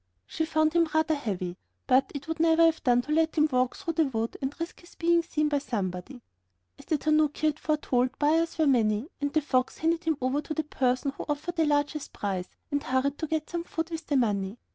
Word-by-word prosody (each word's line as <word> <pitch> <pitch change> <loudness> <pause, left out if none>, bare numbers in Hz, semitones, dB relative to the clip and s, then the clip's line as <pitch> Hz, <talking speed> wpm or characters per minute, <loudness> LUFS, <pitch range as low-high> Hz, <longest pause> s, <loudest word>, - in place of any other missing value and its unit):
She 320 - -2
found 315 0 +2
him 335 -1 +3
rather 315 0 +3
heavy, 185 - -3 0.3
but 260 0 +3
it 285 +1 -6
would 320 0 -3
never 330 0 +5
have 325 -1 +2
done 245 -3 +3
to 300 - -6
let 320 +1 +2
him 305 0 +5
walk 255 0 +1
through 340 -4 -4
the 320 0 +3
wood 225 -3 -2
and 275 +4 -4
risk 335 +1 -5
his 345 - -17
being 340 0 +3
seen 305 -2 -1
by 290 -1 +1
somebody. 220 0 -4 0.6
As - - -13
the 310 - +1
tanaki 305 0 +1
had 305 0 +1
foretold, 260 -4 0
buyers 320 +3 +2
were 320 - +3
many, 230 - +2
and 285 0 0
the 310 - +2
fox 255 -3 0
handed 330 +2 0
him 320 -3 +1
over 260 +3 0
to 310 - -5
the 315 - 0
person 260 -1 0
who - - -7
offered 315 +4 -3
the 325 - +3
largest 290 0 0
price, 190 -3 -3 0.2
and 285 0 0
hurried 265 +1 0
to 315 - -2
get 315 0 -2
some 340 -1 -2
food 330 0 -4
with 325 -1 -5
the 285 - +2
money. 205 -3 0
295 Hz, 230 wpm, -28 LUFS, 255-320 Hz, 0.6 s, never